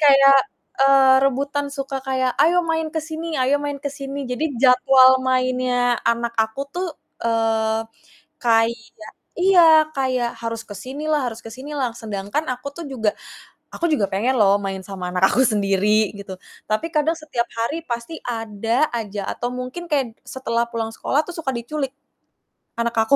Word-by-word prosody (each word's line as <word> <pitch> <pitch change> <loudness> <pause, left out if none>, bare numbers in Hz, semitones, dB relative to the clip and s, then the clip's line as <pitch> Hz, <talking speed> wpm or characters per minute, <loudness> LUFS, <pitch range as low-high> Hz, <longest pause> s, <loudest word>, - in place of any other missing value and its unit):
Kayak, 275 -2 +7 0.4
eee, 270 -1 +6
rebutan, 280 +2 0
suka 275 -1 -4
kayak, 260 -1 0
"Ayo 345 +3 +4
main 320 -1 0
ke - - +1
sini 320 0 -4
ayo 260 +3 +3
main 285 -1 -3
ke 285 0 -4
sini." 275 0 -5
Jadi 265 +4 -2
jadwal 260 0 +6
mainnya 255 -1 +1
anak 235 0 0
aku 220 +3 -1
tuh, 360 +1 -2 0.3
eee, 225 -1 +1 0.6
kayak 230 0 +2 0.6
iya 335 -4 +6
kayak 260 -4 0
harus 230 -1 -4
ke 215 - -16
sini 290 +4 -4
lah 290 -4 +1
harus 225 -1 -7
ke 225 - -9
sini 270 +6 -8
lah, 260 -4 -1
sedangkan 220 +4 -4
aku 255 +3 -9
tuh 340 - -7
juga 225 -6 0 0.6
aku 340 - -2
juga 215 -9 +2
pengen 220 +7 0
loh 200 -1 +5
main 195 -1 -3
sama 185 -2 -5
anak 185 +1 +4
aku 255 - +2
sendiri 210 -1 +2
gitu. 200 -1 -8 0.4
Tapi 215 +10 0
kadang 305 +2 +2
setiap 310 -7 -3
hari 230 +8 -1
pasti 235 +3 -5
ada 225 +4 -1
aja 210 -3 -4
atau 245 - -3
mungkin 250 +7 -6
kayak 260 -6 0
setelah 235 -3 -1
pulang 225 -1 -2
sekolah 280 - 0
tuh 350 - -7
suka 305 -5 -2
diculik 265 +3 -3 0.9
anak 235 0 -1
aku 280 - +5
255 Hz, 165 wpm, -21 LUFS, 225-285 Hz, 0.9 s, Kayak